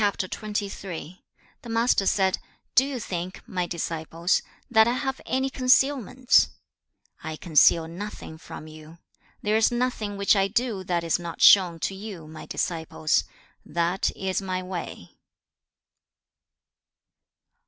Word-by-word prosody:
The 200 -3 -3 0.5
Master 230 -3 +2
said, 190 -2 +2 0.3
'Do 260 - +6
you 275 -3 -4
think, 185 -3 -5
my 180 -1 -2
disciples, 165 +1 -1 0.3
that 220 -2 +5
I 240 - +2
have 265 +1 -3
any 265 +1 0
concealments? 255 -1 +3 0.7
I 160 -1 -4
conceal 160 0 +4
nothing 170 -2 -8
from 155 - -9
you. 155 +1 -13 0.5
There 210 +1 +1
is 225 - +3
nothing 240 -4 -2
which 200 +1 +4
I 195 -1 +3
do 220 -2 -1
that 175 -2 0
is 165 +1 +1
not 170 -1 -4
shown 180 -4 +7
to - - -1
you, 190 -5 -8
my 155 0 -10
disciples; 160 - -1 0.4
that 170 +3 0
is 190 0 -1
my 185 -1 -3
way.' 180 - -7
190 Hz, 120 wpm, -25 LUFS, 170-220 Hz, 0.7 s, shown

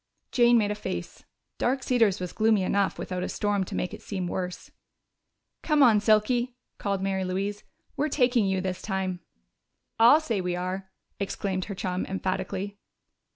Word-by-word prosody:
Jane 240 -1 +5
made 210 -2 +2
a - - +1
face. 90 - -6 0.3
Dark 260 +1 +1
Cedars 225 -6 +3
was 180 -1 -5
gloomy 220 -3 +3
enough 200 +1 +1
without 180 -1 -4
a - - -2
storm 205 -2 0
to - - -6
make 180 - -2
it - - -8
seem 190 -3 -4
worse. 180 0 -4 0.9
"Come 300 -2 +4
on, 225 -5 +6
Silky!" 240 +4 +2 0.2
called 200 -2 -1
Mary 190 -1 0
Louise. 195 +3 -2 0.3
"We're 300 +2 0
taking 245 -6 +3
you 190 -1 0
this 185 -1 -3
time." 190 -3 -2 0.8
"I'll 240 +7 +8
say 230 -11 -1
we 180 -1 -1
are!" 185 +2 -4 0.3
exclaimed 195 -1 -2
her 200 - -6
chum 185 0 -2
emphatically. 190 +1 -3
200 Hz, 160 wpm, -27 LUFS, 185-225 Hz, 0.9 s, I'll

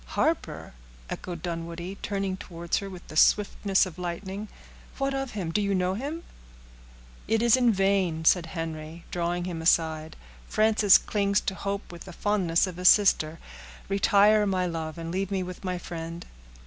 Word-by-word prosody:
"Harper!" - - -1 0.4
echoed 175 -3 -6
Dunwoodie, 170 +2 -5
turning 195 -2 -2
towards 170 -2 -3
her 200 - -4
with 180 -2 -11
the - - -10
swiftness 200 +2 +3
of 180 -1 -9
lightning; 190 +4 -5 0.5
"what 275 0 -1
of 270 -1 -3
him? 185 -6 -3
Do 210 - +1
you 200 -1 0
know 180 0 +1
him?" 290 - -5 1.0
"It 225 +1 +1
is 235 0 +6
in 245 -2 +4
vain," 190 -5 +1
said 170 0 +4
Henry, 160 0 -6
drawing 175 0 -1
him 170 -3 -4
aside; 160 -1 +1 0.3
"Frances 215 -2 +5
clings 200 -1 0
to - - -2
hope 200 +1 -4
with 170 -1 -10
the 185 - -10
fondness 185 -4 +1
of 180 -2 -7
a - - -5
sister. 170 -5 +5 0.5
Retire, 205 +1 +4
my 185 -2 +1
love, 165 -2 -4
and 165 0 -5
leave 190 +1 -2
me 195 -2 -1
with 180 +1 -8
my 185 -1 -2
friend." 170 -1 -7
185 Hz, 165 wpm, -27 LUFS, 170-200 Hz, 1.0 s, is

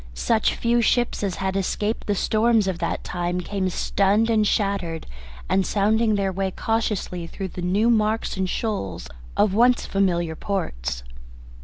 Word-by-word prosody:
Such 220 - +1
few 235 0 +2
ships 240 +1 +1
as 195 -3 -1
had 190 -1 -2
escaped 205 +3 -1
the 205 - +1
storms 220 +1 +2
of 185 -3 -2
that 170 - -2
time 175 0 -2
came 190 +1 -2
stunned 200 +5 +2
and 215 -2 +3
shattered 195 -7 -1 0.4
and 190 - +2
sounding 215 +3 +2
their 195 -1 0
way 190 +1 -1
cautiously 200 -5 -2
through 190 +2 -6
the 180 - -7
new 195 +6 +2
marks 220 0 +1
and 190 -1 -1
shoals 100 - -3 0.3
of 205 -2 +3
once 240 +3 +4
familiar 175 -4 0
ports. 60 - -3
195 Hz, 155 wpm, -23 LUFS, 180-220 Hz, 0.4 s, once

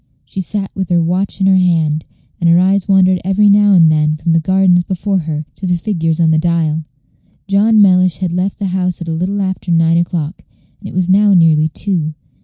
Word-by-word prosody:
She 190 - -6
sat 195 +1 -4
with 190 -2 -5
her 175 -1 +2
watch 180 +5 -2
in - - +2
her 190 -1 +4
hand, 160 -4 0 0.3
and 170 - +1
her 170 - +4
eyes 190 +2 +1
wandered 185 -2 +2
every 195 +3 +2
now 205 0 +4
and 165 -4 +5
then 155 0 +1
from 160 +2 -3
the 165 - +3
gardens 185 +1 +2
before 190 +2 -2
her 155 -2 -5
to 190 - -6
the 180 -1 0
figures 165 -4 -2
on 165 -1 +2
the 155 - +2
dial. 160 -2 -1 0.6
John 210 +3 +2
Mellish 185 -4 +2
had 180 -3 -3
left 185 +2 -2
the 205 - -4
house 180 -2 -2
at 170 - -8
a - - -3
little 190 +5 -2
after 190 -1 -4
nine 165 0 +2
o'clock, 170 -1 -4 0.4
and 195 - -9
it - - -11
was 185 0 0
now 200 +1 +4
nearly 160 -3 +3
two. 160 -2 -3
180 Hz, 215 wpm, -14 LUFS, 165-195 Hz, 0.6 s, and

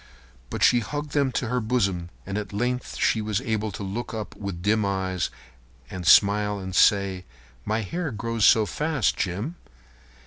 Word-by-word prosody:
But - - -2
she 120 - +6
hugged 145 +5 -5
them 140 -2 +1
to 120 - -1
her 125 +2 0
bosom, 100 -7 0 0.2
and 100 - -5
at 105 -1 -4
length 125 +4 -2
she 110 - +2
was 105 -2 -1
able 110 -1 -2
to 100 - -6
look 110 +4 -4
up 110 -2 -6
with 95 -4 -6
dim 110 +2 +2
eyes 95 -5 -1 0.6
and 90 -2 -6
a - - +4
smile 105 0 +5
and 95 -1 -6
say: 100 -3 +3 0.4
"My 110 +2 0
hair 165 - -3
grows 115 -1 -3
so 110 0 +6
fast, 150 0 0
Jim!" 105 - -3
105 Hz, 175 wpm, -25 LUFS, 100-120 Hz, 0.6 s, she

